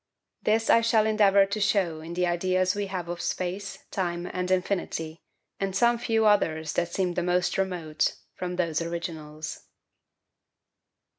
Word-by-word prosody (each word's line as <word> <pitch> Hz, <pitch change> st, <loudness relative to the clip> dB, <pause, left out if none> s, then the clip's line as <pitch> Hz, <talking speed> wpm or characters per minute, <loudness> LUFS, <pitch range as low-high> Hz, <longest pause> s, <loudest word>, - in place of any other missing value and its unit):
This 220 Hz, +1 st, +2 dB
I 230 Hz, -, +6 dB
shall 225 Hz, -2 st, +3 dB
endeavour 200 Hz, -2 st, +5 dB
to 200 Hz, +2 st, -3 dB
show 190 Hz, -6 st, +1 dB
in 165 Hz, +2 st, -7 dB
the 180 Hz, 0 st, +2 dB
ideas 185 Hz, +1 st, +1 dB
we 205 Hz, 0 st, -2 dB
have 185 Hz, -3 st, -4 dB
of 175 Hz, 0 st, -4 dB
space, 185 Hz, +3 st, -3 dB
time, 175 Hz, -2 st, -2 dB
and 180 Hz, 0 st, -3 dB
infinity, 180 Hz, -4 st, -1 dB, 0.4 s
and 195 Hz, -1 st, -2 dB
some 235 Hz, +1 st, +3 dB
few 225 Hz, -1 st, +1 dB
others 160 Hz, -7 st, +2 dB
that 175 Hz, 0 st, 0 dB
seem 180 Hz, -1 st, 0 dB
the 175 Hz, -, -1 dB
most 180 Hz, 0 st, +1 dB
remote, 175 Hz, -5 st, -1 dB, 0.2 s
from 180 Hz, 0 st, -4 dB
those 170 Hz, -3 st, 0 dB
originals. 160 Hz, -2 st, -5 dB
180 Hz, 150 wpm, -27 LUFS, 170-200 Hz, 0.4 s, I